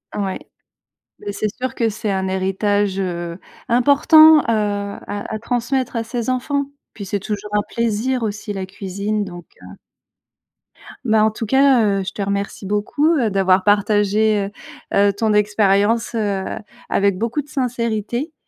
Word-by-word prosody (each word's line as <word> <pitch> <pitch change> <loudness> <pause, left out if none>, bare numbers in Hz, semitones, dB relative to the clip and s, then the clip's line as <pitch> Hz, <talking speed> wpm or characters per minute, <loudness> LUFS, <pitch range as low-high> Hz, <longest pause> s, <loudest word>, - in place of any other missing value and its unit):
Ouais. 195 -2 -2 0.8
Bah, - - -12
c'est 210 +1 -2
sûr 255 -1 -4
que 230 -2 +1
c'est 215 0 -4
un 190 0 -1
héritage, 195 +1 0
heu, 175 -2 -4 0.3
important, 300 +6 +6
heu, - - -11
à 205 -1 -2
à 215 - -3
transmettre 245 +2 -2
à 230 - 0
ses 235 +1 -4
enfants. 280 +3 0
Et - - -12 0.3
puis, 200 - -8
c'est 205 +1 -2
toujours 210 +1 -5
un 210 - +3
plaisir 235 +2 -1
aussi, 205 0 -4
la 190 -1 -4
cuisine 200 +2 -3
donc, 175 -3 -9 0.2
heu. - - -12 1.3
Bah, 220 -1 +3
en 220 - +3
tout 225 +1 -5
cas, 265 -1 +4 0.2
heu, - - -3
je 190 - -5
te 205 - -6
remercie 200 0 -3
beaucoup, 210 - +1
heu, 235 -5 +1
d'avoir 190 -1 +2
partagé, 205 0 +2 0.4
heu - - +3
heu, - - -1
ton 215 +1 0
expérience, 210 +2 +2
heu, 200 -3 -1 0.5
avec 200 -2 +2
beaucoup 230 +8 -1
de 290 - -18
sincérité. 240 - -2
210 Hz, 160 wpm, -20 LUFS, 200-235 Hz, 1.3 s, important